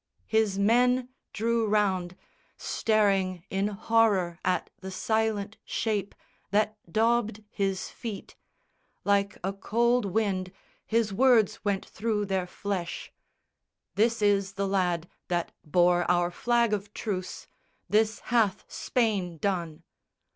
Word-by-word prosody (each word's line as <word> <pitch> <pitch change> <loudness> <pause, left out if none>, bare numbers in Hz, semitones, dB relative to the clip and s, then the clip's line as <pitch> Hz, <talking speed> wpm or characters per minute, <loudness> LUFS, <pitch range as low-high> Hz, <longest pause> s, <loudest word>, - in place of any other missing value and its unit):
His 220 -3 +1
men 245 +4 +3 0.2
drew 230 0 0
round, 190 -4 +1 0.4
Staring 195 -5 +1
in 195 +1 +1
horror 205 -4 +2
at 180 -1 0
the 190 - -7
silent 220 +1 -1
shape 210 -3 -2 0.3
That 215 +1 +1 0.2
daubed 220 0 +1
his 195 -2 -2
feet. 220 -4 -7 0.7
Like 200 0 +1
a 190 +2 -1
cold 235 +4 +1
wind 195 -2 -1 0.4
His 225 -2 +1
words 235 -2 +3
went 200 -2 -1
through 210 -1 -2
their 190 -2 -1
flesh: 180 -2 -4 0.8
"This 225 +1 +2
is 200 -1 +2
the 200 0 -1
lad 180 -3 0 0.2
That 175 -1 -1
bore 175 +2 +3
our 175 0 +2
flag 235 +3 +1
of 205 0 -3
truce. 185 -4 -4 0.4
This 215 0 +2
hath 225 -6 +1
Spain 200 -8 -1
done. 170 -3 -2
200 Hz, 115 wpm, -28 LUFS, 185-220 Hz, 0.8 s, men